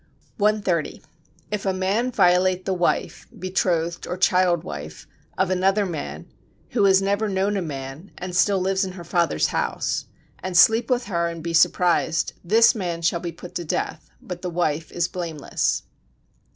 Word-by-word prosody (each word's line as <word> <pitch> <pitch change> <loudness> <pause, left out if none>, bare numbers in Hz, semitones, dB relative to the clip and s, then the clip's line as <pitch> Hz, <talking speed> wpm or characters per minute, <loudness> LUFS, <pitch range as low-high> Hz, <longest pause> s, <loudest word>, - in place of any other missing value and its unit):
130. 200 -6 0 0.5
If 210 -2 -2
a 190 - 0
man 200 +7 0
violate 185 -3 +3
the 190 - 0
wife 175 -1 -1
[betrothed 175 -2 -1
or 180 - -3
child 180 -2 +3
wife] 75 +2 -8 0.3
of 190 0 +1
another 195 +3 +2
man, 165 -6 -5 0.4
who 210 -5 +2
has 190 0 +5
never 200 +2 0
known 195 +1 0
a 195 - 0
man, 140 +2 -6
and 180 0 -6
still 200 +2 +3
lives 190 +1 +1
in 185 -1 -4
her 180 -2 -9
father's 170 - +1
house, - - -1 0.3
and 185 -2 -2
sleep 225 +7 +5
with 250 -1 +1
her 170 -4 0
and 165 -1 -6
be 170 0 -3
surprised, 165 -1 +2
this 225 +8 +5
man 175 -6 -4
shall 170 +1 +2
be 170 0 -4
put 170 +2 -11
to 175 - -3
death, 155 - -3
but 180 -1 -8
the 180 - -3
wife 165 -2 -1
is 175 0 0
blameless. 170 -5 -2
180 Hz, 165 wpm, -23 LUFS, 170-195 Hz, 0.5 s, has